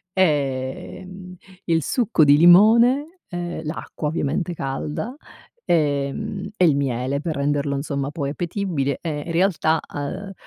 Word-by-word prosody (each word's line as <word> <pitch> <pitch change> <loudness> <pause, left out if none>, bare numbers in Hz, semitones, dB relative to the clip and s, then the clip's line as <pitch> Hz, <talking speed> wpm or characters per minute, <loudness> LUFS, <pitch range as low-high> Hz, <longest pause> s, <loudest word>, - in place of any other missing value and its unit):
Eh, 140 -4 -1
mhmm, 185 -1 -10 0.3
il 165 -1 +2
succo 220 - +2
di 145 0 +6
limone, 235 - +5
e 175 -2 -5
l'acqua 155 0 -4
ovviamente 170 +3 -2
calda, 150 - -4 0.5
ehm, 170 +7 -1
e 185 - +3
il 155 -5 +4
miele 135 0 -1
per 160 -1 -3
renderlo 140 0 0
insomma 140 0 -3
poi 140 -3 -3
appetibile. 170 -4 -2
E 150 -3 -4
in 170 - -3
realtà, 165 -3 +2
uhm, 145 +7 -5
160 Hz, 130 wpm, -22 LUFS, 140-185 Hz, 0.5 s, di